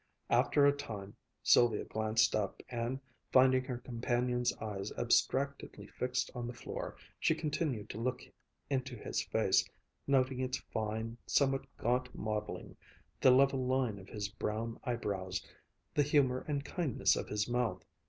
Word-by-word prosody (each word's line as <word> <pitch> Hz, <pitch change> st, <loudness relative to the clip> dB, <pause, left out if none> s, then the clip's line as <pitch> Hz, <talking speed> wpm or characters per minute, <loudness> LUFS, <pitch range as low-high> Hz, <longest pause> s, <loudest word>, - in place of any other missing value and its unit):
After 145 Hz, -, +4 dB
a 145 Hz, -, +7 dB
time 105 Hz, -7 st, -7 dB, 0.3 s
Sylvia 120 Hz, -3 st, +5 dB
glanced 110 Hz, +1 st, +2 dB
up, 105 Hz, -3 st, -2 dB
and 120 Hz, +2 st, -2 dB, 0.3 s
finding 130 Hz, 0 st, +6 dB
her 125 Hz, -2 st, -3 dB
companion's 125 Hz, 0 st, 0 dB
eyes 105 Hz, -3 st, -4 dB
abstractedly 140 Hz, +1 st, +1 dB
fixed 125 Hz, 0 st, -2 dB
on 120 Hz, -1 st, -4 dB
the 120 Hz, -, -6 dB
floor, -, -, -5 dB, 0.2 s
she -, -, +3 dB
continued 145 Hz, -8 st, -2 dB
to 105 Hz, -, -6 dB
look 125 Hz, +2 st, -1 dB, 0.4 s
into 130 Hz, -2 st, -2 dB
his 105 Hz, -, -2 dB
face, -, -, +3 dB, 0.4 s
noting 130 Hz, -2 st, +2 dB
its 130 Hz, 0 st, 0 dB
fine, 110 Hz, +1 st, -4 dB
somewhat 135 Hz, -1 st, +2 dB
gaunt 125 Hz, +1 st, 0 dB
modeling, 105 Hz, -1 st, -4 dB, 0.4 s
the -, -, +6 dB
level 135 Hz, +1 st, +5 dB
line 125 Hz, -5 st, 0 dB
of 95 Hz, -, -13 dB
his 105 Hz, -2 st, -3 dB
brown 110 Hz, +2 st, -3 dB
eyebrows, 100 Hz, -6 st, -2 dB, 0.5 s
the 150 Hz, -, +3 dB
humor 140 Hz, -3 st, +3 dB
and 145 Hz, -1 st, -1 dB
kindness 155 Hz, -6 st, +1 dB
of -, -, -3 dB
his 105 Hz, 0 st, -1 dB
mouth. 120 Hz, -1 st, 0 dB
125 Hz, 145 wpm, -34 LUFS, 110-130 Hz, 0.5 s, a